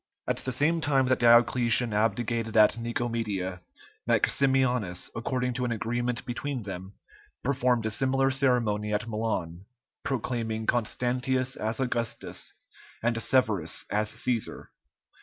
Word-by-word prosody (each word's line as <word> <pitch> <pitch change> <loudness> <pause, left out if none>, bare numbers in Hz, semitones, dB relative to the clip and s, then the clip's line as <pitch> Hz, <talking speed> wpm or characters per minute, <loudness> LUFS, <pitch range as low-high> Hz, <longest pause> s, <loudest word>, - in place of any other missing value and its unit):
At - - 0
the 130 - -3
same 150 +6 +2
time 135 -3 +2
that 130 - +2
Diocletian 120 0 +4
abdicated 115 +1 0
at 105 0 +6
Nicomedia, 115 -6 -3 0.5
Maximianus, 125 -9 +2
according 125 +2 -1
to 125 0 -2
an 120 - -1
agreement 120 +2 -2
between 125 0 -4
them, 95 0 -7 0.5
performed 125 -3 +1
a 110 - 0
similar 135 +3 +2
ceremony 115 -6 +1
at 105 - -2
Milan, 105 -6 -3 0.4
proclaiming 115 -4 -2
Constantius 125 +3 0
as 110 +3 -2
Augustus, 120 -3 -3 0.5
and 115 -1 +1
Severus 110 -11 +1
as 105 +1 +1
Cæsar. 115 0 -2
120 Hz, 120 wpm, -28 LUFS, 110-125 Hz, 0.5 s, at